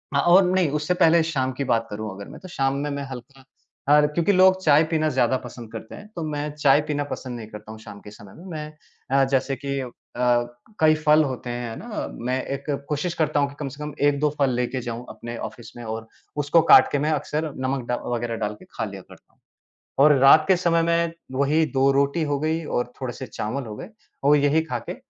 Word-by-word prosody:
अ, - - +4
और 180 +5 +6
नहीं 185 -5 +2
उससे 180 +4 0
पहले 165 0 +5
शाम 130 -1 0
की - - +2
बात 115 0 0
करूँ 105 0 -5
अगर 100 0 -9
मैं - - -11
तो 185 - -10
शाम 135 -3 0
में, 145 +1 -2
मैं 140 0 -4
हल्का 130 +2 -10 0.5
अ, 150 0 +7
क्योंकि 170 +6 +1
लोग 185 0 +5
चाय 150 +1 +5
पीना 155 -1 +1
ज़्यादा 130 -2 +2
पसंद 115 -3 -10
करते 110 0 -8
हैं 210 - -12
तो 165 - -4
मैं 150 0 -3
चाय 145 -1 +4
पीना 145 -1 -1
पसंद 125 -2 -5
नहीं 110 - -8
करता 105 0 -10
हूँ, 110 - -10
शाम 100 -2 -11
के 105 - -12
समय 105 -2 -14
में। 175 - -13
मैं 150 -3 -2
जैसे 135 0 0
कि 140 +1 -3
अ, 125 - -6 0.9
कई 155 0 +5
फ़ल 155 0 +4
होते 130 -3 -4
हैं, 120 -1 -4
है 115 - -6
ना? - - -9
अ, 220 -3 -4
मैं 130 +2 -2
एक 140 - -10 0.2
कोशिश 160 +4 -1
करता 155 -2 +1
हूँ 140 0 +1
कि 140 - -13
कम 145 - -3
से 150 - -8
कम 150 -1 -5
1-2 145 +1 +2
फ़ल 135 -2 +3
लेके 125 +1 -2
जाऊँ 120 0 -6
अपने 120 0 -7
ऑफ़िस 110 0 -14
में 120 - -8
और 110 0 -5 0.4
उसको 165 +3 +5
काट 130 - +8
के 145 - +1
मैं - - +2
अक्सर 150 +1 -2
नमक 130 -2 -2
अ, - - +2 0.2
वग़ैरह 115 0 -3
डाल 105 - -3
के - - -15
खा - - -3
लिया - - -8
करता - - -19
हूँ। - - -38 0.6
और 150 -1 +7
रात 155 +3 +7
के 190 - +5
समय 170 -2 +2
में 170 0 +1 0.3
वही 155 +3 +3
2 135 +1 +4
रोटी 140 +4 +1
हो 140 - +1
गई 160 +1 -1
और 125 -3 -2
थोड़े 130 -2 -3
से 130 - -7
चावल 120 +4 -4
हो 105 -1 -7
गए 180 - -8 0.4
और 145 +1 +6
यही 145 +3 +3
खाके 120 - -4
140 Hz, 235 wpm, -23 LUFS, 125-155 Hz, 0.9 s, काट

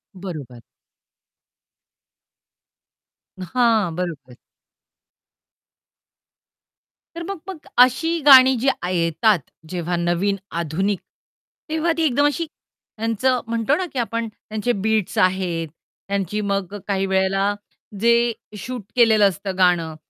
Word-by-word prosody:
बरोबर. 150 -11 -8 2.8
हां, 220 -2 +1
बरोबर. 150 -9 -5 2.8
तर 340 - -5
मग 395 -4 -4
मग 335 -5 -9 0.2
अशी 325 +7 0
गाणी 265 -2 +9
जी 270 - -1 0.2
आ 180 - -2
येतात 175 +3 +2 0.3
जेव्हा 175 0 -2
नवीन 175 +4 0 0.2
आधुनिक, 185 +5 -1 0.7
तेव्हा 320 +2 0
ती 330 - +1
एकदम 285 -1 +2
अशी 290 +3 0
त्यांचं 240 -3 -3
म्हणतो 230 +4 +1
ना 370 - -2
की 255 - -2
आपण 230 -1 -2
त्यांचे 215 +3 -4
बीट्स 220 -3 0
आहेत, 180 -3 +1 0.4
त्यांची 200 +1 -2
मग 200 -1 -2
अ, - - -4
काही 195 -1 0
वेळेला 195 +1 +1 0.5
जे 235 +1 +3 0.3
शूट 245 +2 -6
केलेलं 220 -4 +5
असतं 190 +1 -6
गाणं 175 -4 +2
205 Hz, 105 wpm, -21 LUFS, 180-245 Hz, 2.8 s, गाणी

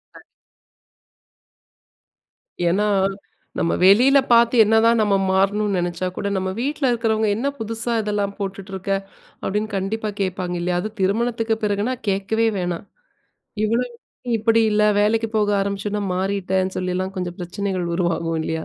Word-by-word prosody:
கண் - - -14 2.5
ஏன்னா, 205 +4 +1 0.7
நம்ம 165 - +1
வெளியில 245 +9 +6
பார்த்து 235 +1 +5
என்னதான் 225 +2 +4
நம்ம 205 -2 +2 0.2
மாறணும்னு 200 +1 +1
நினைச்சா 175 +1 -2
கூட, 200 - -2
நம்ம 190 0 -1
வீட்டில 280 0 0
இருக்கிறவங்க, 220 -2 +1
"என்ன 255 +6 -1
புதுசா 225 +2 -3
இதெல்லாம் 205 -1 -2
போட்டுட்ருக்க?" 195 -1 -5 0.5
அப்படின்னு 210 +2 -1
கண்டிப்பா 210 +3 -2
கேட்பாங்க 185 -2 -2
இல்லையா? 175 0 0
அது 215 - -4
திருமணத்துக்கு 225 +3 0
பிறகுனா 210 +5 0
கேட்கவே 200 +4 +1
வேணாம். 175 +1 -3 0.8
இவ்ளோ, 230 +3 +1 0.5
இப்படி 225 +1 +3
இல்லை, 210 0 +3
வேலைக்கு 225 +2 +2
போக 210 -1 +2
ஆரம்பிச்சொன்னே 200 +1 -2
மாறிட்டேன்னு 190 0 -1
சொல்லிலாம் 185 +1 -2
கொஞ்சம் 175 -1 -4
பிரச்சனைகள் 185 0 -3
உருவாகும், 165 -2 -1
இல்லையா? 160 0 -3
200 Hz, 120 wpm, -21 LUFS, 185-220 Hz, 2.5 s, வெளியில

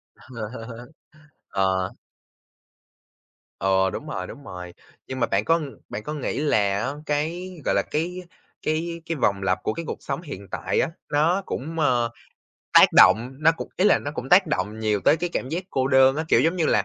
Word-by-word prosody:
Ờ. 115 0 -8 0.6
Ờ. 95 -1 0 1.7
Ừ, 95 0 +2
đúng - - -6
rồi, 90 -1 -4
đúng 140 - -11
rồi. 90 -5 -8 0.3
Nhưng 130 - -5
mà 115 - +2
bạn 100 +2 0
có 165 0 +3 0.3
bạn 105 - -5
có 150 - -5
nghĩ 145 -2 -3
là 145 -5 +2 0.2
á 130 +5 -1
cái, 160 +5 -2 0.2
gọi - - +2
là, - - +3
cái 180 +4 -2 0.4
cái 165 +2 -2
cái 165 -1 -2
vòng 100 -7 0
lặp 95 0 0
của 110 - 0
cái 165 - -5
cuộc - - -4
sống - - -3
hiện 100 - -8
tại - - -1
á, - - +1 0.2
nó 165 +6 +2
cũng, 160 +5 -4
a, 150 - +3 0.9
tác - - +9
động, 120 +4 +6
nó 165 +1 +5
cũng - - -6
ý 185 - +2
là - - +5
nó 145 - -5
cũng 130 - -5
tác 180 +3 +6
động 110 -8 -2
nhiều 105 -2 0
tới 150 - +5
cái 175 +2 -2
cảm 130 - -2
giác 175 +5 -3
cô 130 0 0
đơn 135 0 +5
á, 160 - -1
kiểu, - - +5
giống 165 +3 +2
như 165 - +1
là 105 - +2
135 Hz, 200 wpm, -24 LUFS, 105-165 Hz, 1.7 s, tác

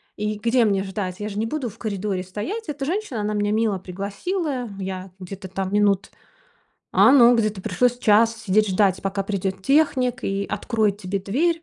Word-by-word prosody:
И 210 0 -2
где 235 +2 +3
мне 195 -2 +1
ждать? 190 -2 -4
Я 210 - -3
же 200 - -7
не 220 - 0
буду 260 +1 -3
в 215 - -15
коридоре 200 -4 -3
стоять. 310 - -5
Эта 280 -2 -3
женщина, 345 - -2
она 210 +1 -1
меня 205 0 0
мило 215 -2 +1
пригласила. 245 - -3
Я 190 -1 -5
где-то 190 +1 -8
там 190 +1 -4
минут 200 -2 +2 0.8
а, - - +6
ну, 245 -3 +7
где-то 215 -3 0
пришлось 245 +5 +1
час 225 0 +4
сидеть 215 -1 +1
ждать, 190 0 +2
пока 195 0 -1
придет 195 -1 -2
техник 265 -3 +2
и 195 0 -1
откроет 215 -4 0
тебе 195 0 -3
дверь. 325 - 0
210 Hz, 180 wpm, -23 LUFS, 195-245 Hz, 0.8 s, ну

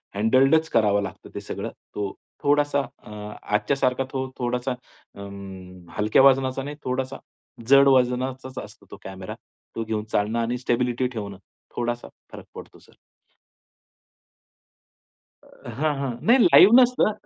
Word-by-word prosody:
हँडल्डच 135 +9 +3
करावं 105 -3 +2
लागतं - - -8
ते - - -4
सगळं. - - -5 0.3
तो 100 -1 -3 0.3
थोडासा 145 0 +2
अ, 120 - -13 0.3
आजच्या 110 +6 0
सारखा 130 0 +1
तो 130 0 -3
थोडासा 125 +1 -1
अं, 100 -6 -11
हलक्या 105 +5 +3
वजनाचा 135 -1 +3
नाही, 145 +1 -6
थोडासा 130 +1 -3 0.5
जड 140 +1 +7
वजनाचाच 130 0 +1
असतो - - -15
तो - - -9
कॅमेरा, 95 -1 -8 0.4
तो 115 - -2
घेऊन 110 -1 -3
चालणं 105 +3 0
आणि 115 +2 -1
स्टॅबिलिटी 125 0 0
ठेवणं 105 -5 -7 0.4
थोडासा 120 0 -3 0.2
फरक - - -10
पडतो - - -11
सर. - - -23 2.5
अ, - - -14
हां, 150 +1 +1
हां. 135 -2 -2
नाही 240 +4 +6
लाईव्ह 215 - +7
नसतं. 250 -3 +3
125 Hz, 130 wpm, -24 LUFS, 105-135 Hz, 2.5 s, जड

